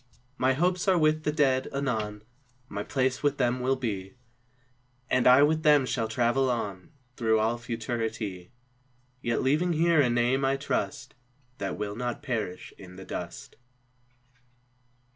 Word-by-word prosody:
My 130 Hz, 0 st, +2 dB
hopes 180 Hz, +6 st, 0 dB
are 190 Hz, -2 st, +4 dB
with 155 Hz, -1 st, +2 dB
the 150 Hz, -, +2 dB
Dead, 135 Hz, -4 st, +2 dB
anon 110 Hz, -7 st, -2 dB, 0.4 s
My 100 Hz, -3 st, -5 dB
place 130 Hz, +3 st, -1 dB
with 145 Hz, -1 st, +1 dB
them 125 Hz, -1 st, +1 dB
will 130 Hz, +2 st, +1 dB
be, 105 Hz, -5 st, -4 dB, 1.0 s
And 130 Hz, -1 st, +3 dB
I 130 Hz, +3 st, +8 dB
with 155 Hz, +2 st, +2 dB
them 150 Hz, -4 st, +5 dB
shall 115 Hz, -3 st, -1 dB
travel 120 Hz, +4 st, +1 dB
on 100 Hz, -6 st, -3 dB, 0.3 s
Through 110 Hz, -2 st, +2 dB
all 115 Hz, +2 st, 0 dB
Futurity; 115 Hz, -5 st, -4 dB, 0.7 s
Yet 120 Hz, +1 st, -1 dB
leaving 155 Hz, +7 st, +2 dB
here 165 Hz, -1 st, +4 dB
a 130 Hz, -, +2 dB
name, 120 Hz, +3 st, +1 dB
I 135 Hz, +1 st, +2 dB
trust, 105 Hz, -8 st, -3 dB, 0.5 s
That 100 Hz, -, -3 dB
will 105 Hz, -1 st, -4 dB
not 125 Hz, +3 st, -4 dB
perish 110 Hz, -9 st, -4 dB
in 90 Hz, -2 st, -12 dB
the 95 Hz, 0 st, -10 dB
dust. -, -, -7 dB
125 Hz, 145 wpm, -28 LUFS, 110-140 Hz, 1.0 s, I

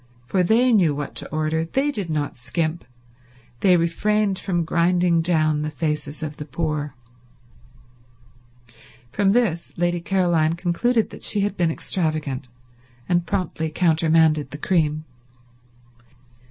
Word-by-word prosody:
For 165 Hz, +9 st, +1 dB
they 235 Hz, +7 st, +3 dB
knew 170 Hz, -9 st, +3 dB
what 145 Hz, -1 st, -5 dB
to -, -, -4 dB
order; 155 Hz, +1 st, -1 dB
they 270 Hz, -, 0 dB
did 200 Hz, -, -4 dB
not 150 Hz, -2 st, -2 dB
skimp; 155 Hz, +7 st, -3 dB, 0.7 s
they 185 Hz, -2 st, +5 dB
refrained 195 Hz, +4 st, +1 dB
from 175 Hz, -4 st, -1 dB
grinding 170 Hz, 0 st, +2 dB
down 155 Hz, -3 st, +2 dB
the 150 Hz, -, -2 dB
faces 150 Hz, -1 st, -3 dB
of 150 Hz, -1 st, -5 dB
the 150 Hz, -, -6 dB
poor. 150 Hz, -1 st, -3 dB, 2.2 s
From 200 Hz, +5 st, +1 dB
this 195 Hz, -7 st, +1 dB
Lady 175 Hz, 0 st, 0 dB
Caroline 170 Hz, -4 st, +1 dB
concluded 195 Hz, +7 st, 0 dB
that -, -, -11 dB
she 210 Hz, -, +1 dB
had 205 Hz, 0 st, -1 dB
been 175 Hz, -3 st, +1 dB
extravagant, 155 Hz, -6 st, -2 dB, 0.6 s
and 175 Hz, -1 st, +1 dB
promptly 160 Hz, -3 st, -2 dB
countermanded 160 Hz, -3 st, +2 dB
the 145 Hz, -, -7 dB
cream. 155 Hz, -2 st, 0 dB
165 Hz, 125 wpm, -22 LUFS, 155-185 Hz, 2.2 s, they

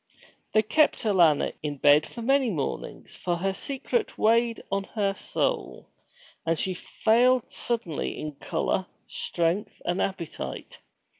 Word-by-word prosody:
They 215 Hz, -, +5 dB
kept 300 Hz, +8 st, +3 dB
Alanna 175 Hz, -9 st, +4 dB
in 145 Hz, -1 st, -3 dB
bed 145 Hz, +2 st, +5 dB
for 235 Hz, -, -8 dB
many 270 Hz, 0 st, +3 dB
mornings, 150 Hz, -9 st, -4 dB
for 175 Hz, -, -1 dB
her 190 Hz, +3 st, -1 dB
secret 280 Hz, -, -2 dB
weighed 230 Hz, +1 st, +2 dB
on 195 Hz, 0 st, 0 dB
her 200 Hz, -2 st, +1 dB
soul, -, -, -2 dB, 0.5 s
and 165 Hz, 0 st, +1 dB
she 185 Hz, -, -1 dB
failed 240 Hz, +6 st, +3 dB
suddenly 220 Hz, -10 st, -2 dB
in 155 Hz, -, -4 dB
color, 165 Hz, +5 st, -2 dB, 0.2 s
strength, 170 Hz, +4 st, -1 dB
and 175 Hz, +1 st, 0 dB
appetite. 170 Hz, -, -4 dB
195 Hz, 130 wpm, -27 LUFS, 165-235 Hz, 0.5 s, They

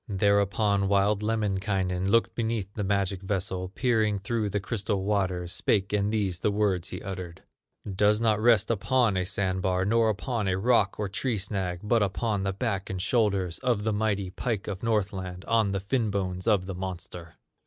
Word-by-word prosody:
Thereupon 100 Hz, 0 st, +2 dB
wild 100 Hz, +1 st, +2 dB
Lemminkainen 95 Hz, -4 st, -1 dB
Looked 115 Hz, +3 st, +3 dB
beneath 110 Hz, -4 st, -2 dB
the 105 Hz, -, -3 dB
magic 100 Hz, -1 st, 0 dB
vessel, 95 Hz, -2 st, -2 dB
Peering 110 Hz, -1 st, +1 dB
through 105 Hz, +2 st, -2 dB
the 100 Hz, +1 st, -1 dB
crystal 100 Hz, 0 st, -2 dB
waters, 95 Hz, -4 st, -1 dB
Spake 100 Hz, -1 st, 0 dB
and 105 Hz, 0 st, +1 dB
these 100 Hz, -5 st, -1 dB
the 105 Hz, -, +1 dB
words 100 Hz, -4 st, 0 dB
he -, -, -7 dB
uttered: 90 Hz, -3 st, -7 dB, 0.5 s
"Does 105 Hz, +1 st, +4 dB
not 110 Hz, -2 st, +2 dB
rest 115 Hz, -2 st, +4 dB
upon 115 Hz, 0 st, +2 dB
a 90 Hz, 0 st, 0 dB
sand 95 Hz, -1 st, -1 dB
bar, 90 Hz, 0 st, +1 dB
Nor 115 Hz, +2 st, +3 dB
upon 110 Hz, 0 st, -2 dB
a 90 Hz, -1 st, +1 dB
rock, 105 Hz, -2 st, +3 dB
nor 105 Hz, -, -2 dB
tree 110 Hz, +5 st, -1 dB
snag, 95 Hz, -3 st, -2 dB
But 115 Hz, +2 st, +2 dB
upon 105 Hz, +1 st, 0 dB
the 95 Hz, 0 st, 0 dB
back 100 Hz, -1 st, -2 dB
and 95 Hz, -, -3 dB
shoulders 100 Hz, -5 st, +1 dB
Of 120 Hz, -5 st, 0 dB
the 110 Hz, 0 st, 0 dB
mighty 100 Hz, -3 st, -1 dB
pike 110 Hz, 0 st, -3 dB
of 95 Hz, -3 st, -4 dB
Northland, 95 Hz, -5 st, -2 dB
On 110 Hz, -3 st, +2 dB
the 100 Hz, -, -1 dB
fin 110 Hz, +3 st, 0 dB
bones 90 Hz, -2 st, -2 dB
of 100 Hz, -5 st, +3 dB
the 95 Hz, -, -5 dB
monster." 90 Hz, -2 st, -6 dB
100 Hz, 180 wpm, -27 LUFS, 95-110 Hz, 0.5 s, Does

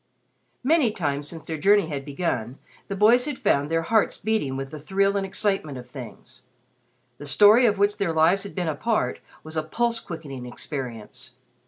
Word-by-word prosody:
Many 295 Hz, -2 st, +3 dB
times 145 Hz, -8 st, -2 dB
since 165 Hz, 0 st, -8 dB
their 160 Hz, -2 st, -4 dB
journey 200 Hz, +3 st, +4 dB
had 145 Hz, -4 st, -5 dB
begun 135 Hz, -5 st, -3 dB, 0.3 s
the 195 Hz, -, -4 dB
boys 230 Hz, +5 st, +5 dB
had 290 Hz, -4 st, -3 dB
found 140 Hz, +1 st, +1 dB
their 165 Hz, 0 st, +1 dB
hearts 220 Hz, +4 st, +2 dB
beating 200 Hz, -11 st, -1 dB
with 135 Hz, 0 st, -5 dB
the 155 Hz, -, -7 dB
thrill 195 Hz, +5 st, +1 dB
and 200 Hz, -, 0 dB
excitement 195 Hz, -8 st, -1 dB
of 125 Hz, 0 st, -9 dB
things. 125 Hz, -2 st, -11 dB, 0.8 s
The 145 Hz, -, -8 dB
story 210 Hz, -, +6 dB
of 205 Hz, -2 st, +1 dB
which 205 Hz, +1 st, +2 dB
their 195 Hz, -4 st, +1 dB
lives 160 Hz, +5 st, +3 dB
had 200 Hz, -, -7 dB
been 180 Hz, -3 st, -2 dB
a 160 Hz, -, 0 dB
part 150 Hz, -, -1 dB, 0.2 s
was 155 Hz, 0 st, -8 dB
a 155 Hz, -, +1 dB
pulse 230 Hz, +9 st, -1 dB
quickening 145 Hz, -, -8 dB
experience. 120 Hz, -3 st, -6 dB
165 Hz, 185 wpm, -25 LUFS, 140-205 Hz, 0.8 s, story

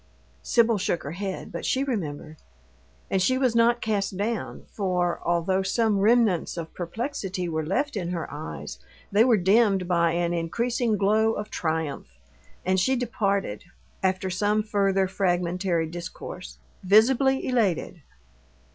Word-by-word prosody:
Sibyl 230 Hz, -3 st, +2 dB
shook 175 Hz, -2 st, -1 dB
her 140 Hz, -, -5 dB
head, 190 Hz, +2 st, -5 dB
but -, -, -6 dB
she 265 Hz, -, +1 dB
remembered. 160 Hz, -, -4 dB, 0.7 s
And 190 Hz, -, +2 dB
she 255 Hz, +7 st, +2 dB
was 255 Hz, -3 st, +1 dB
not 235 Hz, +1 st, +3 dB
cast 200 Hz, -3 st, -1 dB
down, 220 Hz, +3 st, -3 dB
for, 180 Hz, -3 st, -1 dB
although 175 Hz, +3 st, +1 dB
some 210 Hz, +1 st, +1 dB
remnants 215 Hz, -5 st, +2 dB
of 165 Hz, -1 st, -6 dB
perplexity 190 Hz, -, -4 dB
were 160 Hz, -1 st, -2 dB
left 245 Hz, -, -1 dB
in 180 Hz, -4 st, -2 dB
her 175 Hz, -2 st, -3 dB
eyes, 75 Hz, -, -7 dB, 0.3 s
they 205 Hz, +3 st, +5 dB
were 240 Hz, -3 st, +4 dB
dimmed 195 Hz, 0 st, +3 dB
by 170 Hz, -2 st, +2 dB
an 170 Hz, 0 st, 0 dB
increasing 230 Hz, +7 st, 0 dB
glow 215 Hz, +3 st, +3 dB
of 210 Hz, 0 st, -5 dB
triumph; 155 Hz, -, -3 dB, 0.5 s
and 185 Hz, +1 st, +2 dB
she 260 Hz, +9 st, +2 dB
departed 200 Hz, -, -1 dB, 0.4 s
after 190 Hz, 0 st, 0 dB
some 210 Hz, +3 st, +1 dB
further 195 Hz, -2 st, +1 dB
fragmentary 180 Hz, -2 st, 0 dB
discourse 160 Hz, -, -8 dB, 0.3 s
visibly 260 Hz, +7 st, +4 dB
elated. 200 Hz, -9 st, 0 dB
195 Hz, 140 wpm, -25 LUFS, 175-225 Hz, 0.7 s, they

